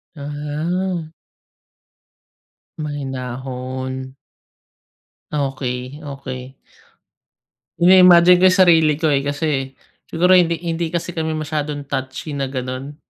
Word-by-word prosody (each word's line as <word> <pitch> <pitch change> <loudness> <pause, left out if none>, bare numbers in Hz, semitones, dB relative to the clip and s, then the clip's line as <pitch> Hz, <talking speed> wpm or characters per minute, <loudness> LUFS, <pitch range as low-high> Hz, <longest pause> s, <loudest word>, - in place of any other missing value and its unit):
Aha. 155 +4 -3 1.7
Mahinahon. 130 -2 -5 1.2
Okey, 135 -1 -3
okey. 135 -2 -7 1.2
Ini-imagine 180 0 +7
ko 185 - +7
yung 185 +1 +2
sarili 160 -3 +4
ko 155 0 +1
eh, 140 - +2
kasi 145 -2 -2 0.3
siguro 180 +3 +2
hindi 170 -2 +4
hindi 165 0 -2
kasi 170 +1 -3
kami 160 -1 -2
masyadong 150 -1 -3
touchy 135 +2 -5
na 140 -2 -2
ganun. 130 +2 -5
145 Hz, 90 wpm, -20 LUFS, 130-165 Hz, 1.7 s, Ini-imagine